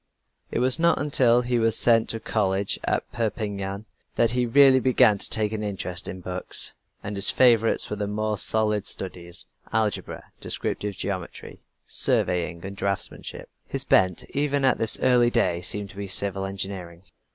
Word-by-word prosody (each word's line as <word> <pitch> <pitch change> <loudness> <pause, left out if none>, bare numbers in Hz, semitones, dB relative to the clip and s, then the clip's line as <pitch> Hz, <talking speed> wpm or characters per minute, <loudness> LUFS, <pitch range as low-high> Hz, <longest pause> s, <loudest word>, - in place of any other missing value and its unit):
It - - -3
was 125 +4 +2
not 170 +1 +3
until 125 -4 +3
he 120 0 0
was 115 -1 +3
sent 115 -2 +3
to 115 - -1
college 100 -3 -1
at - - 0
Perpignan, 105 -3 -3 0.3
that 115 - +2
he 125 0 0
really 135 +1 +6
began 120 -5 +3
to - - -3
take 105 -1 +2
an 110 -1 -3
interest 95 -3 -1
in 95 - -7
books, 90 +1 -4 0.3
and 105 - -5
his 100 +1 +1
favorites 115 -3 +3
were 105 - -5
the 105 0 -2
more 105 0 -2
solid 105 -2 +1
studies 85 -2 -5 0.3
algebra, 110 -3 -2
descriptive 105 -1 -3
geometry, 95 -2 -6 0.2
surveying, 90 0 +1
and 100 0 -7
draftsmanship. 100 -1 -4 0.2
His - - -3
bent 95 -2 +2
even 145 -1 0
at 130 - +3
this 110 - +4
early 125 -2 +4
day 90 -6 0
seemed 100 +2 -4
to - - -17
be 100 0 -5
civil 95 0 -2
engineering. 95 -3 -5
105 Hz, 165 wpm, -25 LUFS, 95-115 Hz, 0.3 s, really